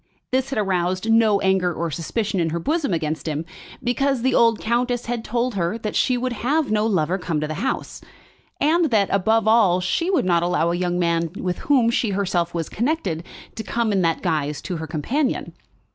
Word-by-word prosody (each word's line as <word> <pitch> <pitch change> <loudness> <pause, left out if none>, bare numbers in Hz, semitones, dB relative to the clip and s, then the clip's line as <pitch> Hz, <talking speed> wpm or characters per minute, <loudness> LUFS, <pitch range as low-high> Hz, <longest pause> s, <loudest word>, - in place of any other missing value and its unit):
This 260 +1 0
had 270 - -3
aroused 185 +1 0
no 220 -3 +4
anger 190 -2 +2
or 170 0 -3
suspicion 195 +6 -2
in 165 -1 +1
her 165 - -2
bosom 300 - -1
against 160 -1 -2
him, 155 +1 -2 0.4
because 260 +1 0
the 260 0 +2
old 230 -2 +4
countess 245 +1 0
had 235 -1 -3
told 240 +2 -1
her 185 +2 -1
that 215 -2 -5
she 255 -2 +2
would 250 0 -2
have 285 +1 +1
no 215 0 +2
lover 185 -2 0
come 170 -4 -2
to 155 - -2
the 155 - -4
house, 265 - -3 0.6
and 325 +4 +3
that, 210 -5 +2
above 220 +3 +2
all, 215 -5 +4
she 185 - -1
would 370 - +2
not 170 -2 +3
allow 170 -1 +1
a - - 0
young 175 0 -1
man 170 -1 +1
with 180 -1 -3
whom 250 -5 +4
she 230 -1 0
herself 175 -4 0
was 165 -2 -3
connected 215 - -2 0.3
to - - -5
come 230 0 -1
in 195 -2 +2
that 165 -2 0
guise 150 -4 -1
to 180 - -4
her 160 0 -5
companion. 235 - -2
200 Hz, 205 wpm, -22 LUFS, 170-240 Hz, 0.6 s, no